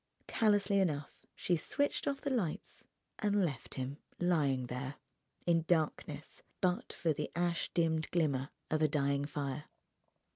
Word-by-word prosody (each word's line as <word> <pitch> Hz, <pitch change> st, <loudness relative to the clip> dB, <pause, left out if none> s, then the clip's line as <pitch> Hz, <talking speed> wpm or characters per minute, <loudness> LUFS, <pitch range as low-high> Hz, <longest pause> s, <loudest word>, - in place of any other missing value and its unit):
Callously 205 Hz, -2 st, +3 dB
enough 150 Hz, -6 st, -1 dB
she 175 Hz, -, +1 dB
switched 285 Hz, -, 0 dB
off 280 Hz, -1 st, 0 dB
the 280 Hz, -, -1 dB
lights 200 Hz, -12 st, -2 dB, 0.3 s
and 205 Hz, -3 st, +3 dB
left 140 Hz, -8 st, -4 dB
him 135 Hz, +2 st, -3 dB, 0.2 s
lying 145 Hz, -8 st, +2 dB
there, 130 Hz, +3 st, -4 dB, 0.5 s
in 165 Hz, -2 st, +4 dB
darkness 155 Hz, -2 st, 0 dB, 0.2 s
but 185 Hz, +4 st, +1 dB
for 165 Hz, -3 st, +1 dB
the 150 Hz, +1 st, -3 dB
ash 175 Hz, 0 st, +1 dB
dimmed 160 Hz, -2 st, +2 dB
glimmer 145 Hz, -5 st, +1 dB, 0.2 s
of 155 Hz, 0 st, +2 dB
a 155 Hz, -, +6 dB
dying 140 Hz, -1 st, +1 dB
fire. 145 Hz, 0 st, -3 dB
160 Hz, 140 wpm, -34 LUFS, 140-180 Hz, 0.5 s, a